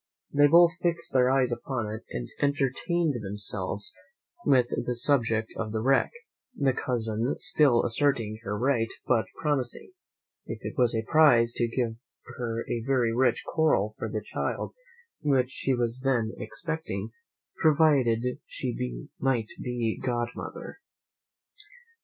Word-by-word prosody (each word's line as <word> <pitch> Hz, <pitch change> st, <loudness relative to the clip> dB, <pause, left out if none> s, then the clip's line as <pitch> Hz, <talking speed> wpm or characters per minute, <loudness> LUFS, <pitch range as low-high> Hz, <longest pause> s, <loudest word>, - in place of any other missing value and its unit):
They 145 Hz, 0 st, +6 dB
both 170 Hz, +2 st, +6 dB
fixed 170 Hz, -1 st, -1 dB
their 125 Hz, -1 st, +4 dB
eyes 130 Hz, -2 st, +2 dB
upon 120 Hz, 0 st, -3 dB
it, 110 Hz, -, -6 dB
and -, -, -4 dB
entertained 145 Hz, +1 st, 0 dB
themselves 105 Hz, -, -3 dB, 0.5 s
with 125 Hz, -3 st, +4 dB, 0.2 s
the 125 Hz, -, 0 dB
subject 115 Hz, -4 st, +1 dB
of 110 Hz, -1 st, -3 dB
the 110 Hz, 0 st, -2 dB
wreck, 135 Hz, +1 st, +3 dB, 0.5 s
the 135 Hz, -, +2 dB
cousin 115 Hz, 0 st, -1 dB
still 150 Hz, -11 st, +3 dB
asserting 115 Hz, -4 st, +1 dB
her 105 Hz, -2 st, -3 dB
right, 120 Hz, -1 st, +1 dB, 0.2 s
but 115 Hz, -3 st, +2 dB
promising, 145 Hz, -, -1 dB, 0.6 s
"if -, -, -4 dB
it -, -, -3 dB
was 125 Hz, -2 st, +5 dB
a 110 Hz, -, 0 dB
prize, 120 Hz, -4 st, +5 dB
to 120 Hz, -, +2 dB
give 115 Hz, -1 st, -2 dB, 0.4 s
her 115 Hz, -2 st, -3 dB
a 120 Hz, -1 st, -2 dB
very 125 Hz, -2 st, +1 dB
rich 120 Hz, -1 st, +2 dB
coral 150 Hz, -10 st, +1 dB
for 110 Hz, -, -3 dB
the 105 Hz, 0 st, -3 dB
child -, -, -3 dB, 0.5 s
which 135 Hz, -4 st, +2 dB
she 135 Hz, -1 st, 0 dB
was 120 Hz, +1 st, -1 dB
then 120 Hz, -5 st, +1 dB
expecting, 160 Hz, -, -5 dB, 0.5 s
provided 145 Hz, -7 st, +4 dB, 0.2 s
she 65 Hz, -, -4 dB
might 120 Hz, -5 st, 0 dB
be 120 Hz, -3 st, -2 dB
godmother." 120 Hz, -, -4 dB
125 Hz, 135 wpm, -27 LUFS, 115-140 Hz, 0.6 s, They